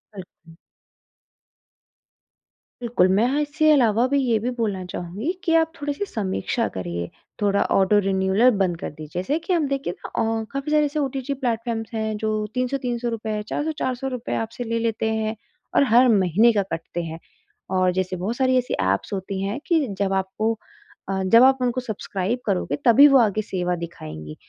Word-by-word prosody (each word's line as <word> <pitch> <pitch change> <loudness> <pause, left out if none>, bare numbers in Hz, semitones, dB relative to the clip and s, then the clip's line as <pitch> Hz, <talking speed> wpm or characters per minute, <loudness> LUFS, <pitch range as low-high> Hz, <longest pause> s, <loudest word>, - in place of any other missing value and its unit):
बिल्कुल। 180 -3 -13 2.3
बिल्कुल, 235 -6 +2
मैं 195 +5 +3
हाँ 280 +3 +1
इससे 305 +1 +2
अलावा 240 -5 +4
भी 280 +2 +1
ये 240 -4 +2
भी 235 +4 -2
बोलना 215 -6 -2
चाहूँगी 180 - -4
कि 335 -3 +1
आप 325 0 +3
थोड़ी-सी 290 +7 -2
समीक्षा 220 - -2
करिए, 85 -1 -4 0.3
थोड़ा 200 -1 +2
ऑटो 195 +2 +4
रिन्यूअल 190 +5 +3
बंद 185 -3 +1
कर - - -4
दीजिए, 155 +1 -10
जैसे 280 +11 0
कि 335 +3 -2
हम 325 -4 +1
देखिए 275 -10 -2
ना - - -5 0.3
अ, - - -3
काफ़ी 275 +2 -3
सारे 300 -1 +4
ऐसे 295 +1 -2
ओटीटी 270 -1 -2
प्लेटफ़ॉर्म्स 230 -4 -2
हैं, 220 -1 -2
जो 215 0 -1
300-300 250 -2 -2
रुपए, 220 -2 -3
400-400 270 -4 -2
रुपए 250 -3 -4
आपसे 225 +2 -4
ले 230 0 -2
लेते 225 -1 -1
हैं 220 0 -1 0.4
और - - +6
हर 250 +2 +7
महीने 195 +5 +4
का 205 -2 +2
कटते 170 +1 -4
हैं। 165 0 -6 0.6
और 185 0 +3
जैसे 185 0 -1
बहुत 190 +6 -3
सारी 260 -1 +3
ऐसी 250 0 -1
ऐप्स 95 - 0
होती 190 0 -3
हैं 200 +6 -2
कि, 320 -5 +2
जब 195 -1 +1
आपको 205 +4 -1 0.5
अ, 190 0 -1
जब 230 +6 +6
आप 265 0 +6
उनको 250 0 0
सब्सक्राइब 220 -1 -3
करोगे, 180 -8 0
तभी 260 +5 +8
वो 275 -2 +6
आगे 215 -2 +2
सेवा 180 -3 -2
दिखाएँगी। 80 - -8
225 Hz, 175 wpm, -23 LUFS, 190-255 Hz, 2.3 s, तभी